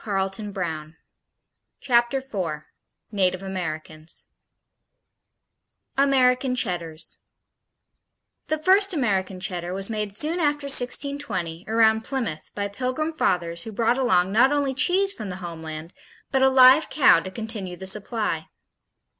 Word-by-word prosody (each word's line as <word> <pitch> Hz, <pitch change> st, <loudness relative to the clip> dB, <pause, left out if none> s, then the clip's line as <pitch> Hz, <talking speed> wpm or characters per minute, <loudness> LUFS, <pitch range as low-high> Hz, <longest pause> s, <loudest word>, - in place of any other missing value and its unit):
Chapter 240 Hz, 0 st, +2 dB
Four 180 Hz, -, -4 dB, 0.5 s
Native 185 Hz, -2 st, +1 dB
Americans 160 Hz, -4 st, -4 dB, 1.7 s
American 260 Hz, -2 st, +3 dB
Cheddars 170 Hz, -8 st, -3 dB, 1.3 s
The 310 Hz, -, 0 dB
first 380 Hz, +4 st, +4 dB
American 195 Hz, -8 st, -1 dB
Cheddar 180 Hz, -1 st, -4 dB
was 195 Hz, +3 st, -3 dB
made 210 Hz, -2 st, -3 dB
soon 315 Hz, +8 st, -1 dB
after 295 Hz, -2 st, 0 dB
1620 255 Hz, -, -1 dB
around 220 Hz, 0 st, +3 dB
Plymouth 230 Hz, -, -4 dB
by 205 Hz, 0 st, -2 dB
Pilgrim 255 Hz, +9 st, -2 dB
fathers 170 Hz, -, 0 dB
who 225 Hz, -, -6 dB
brought 230 Hz, +4 st, +1 dB
along 190 Hz, -8 st, +2 dB
not 245 Hz, +6 st, +4 dB
only 285 Hz, -2 st, 0 dB
cheese 380 Hz, +8 st, +2 dB
from 215 Hz, -, -6 dB
the 180 Hz, -, -5 dB
homeland 160 Hz, -2 st, -8 dB, 0.4 s
but 265 Hz, -, +2 dB
a 265 Hz, -, +6 dB
live 260 Hz, +3 st, +7 dB
cow 270 Hz, -, +5 dB
to 190 Hz, -, -6 dB
continue 205 Hz, -3 st, -4 dB
the 190 Hz, -, -8 dB
supply. 200 Hz, -4 st, -2 dB
220 Hz, 115 wpm, -24 LUFS, 180-265 Hz, 1.7 s, live